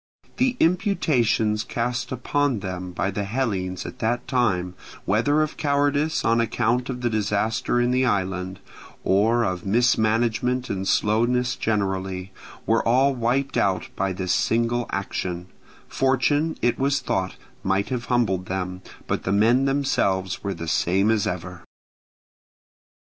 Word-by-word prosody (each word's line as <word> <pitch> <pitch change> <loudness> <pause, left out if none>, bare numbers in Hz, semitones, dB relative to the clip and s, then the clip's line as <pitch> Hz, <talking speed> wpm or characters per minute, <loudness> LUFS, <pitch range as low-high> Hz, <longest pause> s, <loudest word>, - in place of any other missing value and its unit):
The 255 -1 +1
imputations 135 - +2
cast 125 +2 -3
upon 130 -1 0
them 90 -1 -5
by 95 +2 -1
the 100 +1 -2
Hellenes 100 -5 -2
at - - -8
the 120 +2 +1
time, 95 -9 0 0.3
whether 145 +9 +2
of 155 - -5
cowardice 145 +1 +1
on 115 0 +3
account 120 +2 0
of 125 -1 -4
the 120 - +1
disaster 110 +2 0
in 120 0 +2
the 130 +1 +2
island, 95 -4 -1 0.4
or 110 +5 +3
of 90 -4 -2
mismanagement 120 +3 +1
and 95 -1 -3
slowness 120 +4 +2
generally, 95 -3 -2 0.3
were 115 0 +2
all 130 +4 +3
wiped 130 +3 0
out 95 -2 +1
by 95 0 -1
this 90 -1 -1
single 120 +1 +1
action: 90 -2 -4 0.4
fortune, 145 +4 +1
it 120 0 +2
was 140 +1 +2
thought, 95 -1 -2 0.3
might 95 +1 0
have 125 -2 -3
humbled 95 -7 0
them, 90 -1 -3 0.2
but - - -1
the 95 - -2
men 115 +6 +4
themselves 100 -9 0
were 100 -1 -2
the 85 0 -6
same 95 +6 +2
as 110 -3 +1
ever. 90 0 -5
115 Hz, 135 wpm, -24 LUFS, 95-125 Hz, 0.4 s, men